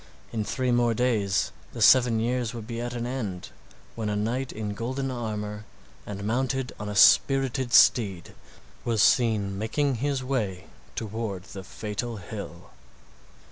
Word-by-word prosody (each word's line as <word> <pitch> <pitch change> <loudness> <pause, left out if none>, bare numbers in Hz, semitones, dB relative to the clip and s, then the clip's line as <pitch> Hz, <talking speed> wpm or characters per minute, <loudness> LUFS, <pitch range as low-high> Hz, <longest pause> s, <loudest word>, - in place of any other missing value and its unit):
In 110 -2 -1
three 130 +4 -1
more 120 -1 +2
days 110 -5 +1 0.2
the - - -7
seven 120 -3 +6
years 120 0 -1
would 115 -2 -6
be 115 0 -5
at 120 0 -4
an 120 0 -3
end, 110 -8 -4 0.4
when 110 -2 -3
a 105 - -1
knight 120 +5 -1
in 105 -1 -4
golden 130 +5 -3
armor 105 -3 -4 0.4
and 100 -1 -5
mounted 130 +3 -1
on 105 -1 -4
a 105 - -4
spirited 135 +3 +4
steed 100 -8 +4 0.5
was 115 -3 +2
seen 105 -5 +2
making 130 +5 0
his 140 -2 0
way 110 -9 -2 0.3
toward 110 -4 -4
the 95 -2 -9
fatal 110 +3 -5
hill. 95 -3 -8
115 Hz, 145 wpm, -26 LUFS, 105-125 Hz, 0.5 s, seven